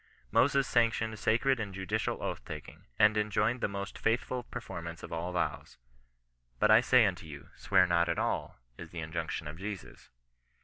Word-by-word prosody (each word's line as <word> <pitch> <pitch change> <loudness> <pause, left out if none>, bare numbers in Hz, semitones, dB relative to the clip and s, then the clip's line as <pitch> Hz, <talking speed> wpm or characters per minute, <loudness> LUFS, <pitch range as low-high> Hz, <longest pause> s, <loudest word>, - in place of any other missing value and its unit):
Moses 140 0 +3
sanctioned 110 -2 +1
sacred 125 +4 +2
and 100 -3 -4
judicial 95 -2 -2
oath - - -3
taking, 75 -1 -9
and 105 0 +5
enjoined* 105 +3 +1
the - - +2
most 100 -1 -6
faithful 125 +2 0
performance 85 -7 -7
of - - -7
all 85 +2 -3
vows. 90 - -3 0.4
" - - -43
But 105 - +4
I 110 +2 +8
say 125 -2 +5
unto 90 -4 -2
you, 70 -2 -10
swear 95 -2 +3
not 85 -1 +2
at 85 - 0
all," - - -2 0.2
is 85 - -8
the 85 - -11
injunction 80 -1 -4
of 75 +3 -8
Jesus. 100 -1 -7
100 Hz, 175 wpm, -31 LUFS, 85-110 Hz, 0.4 s, I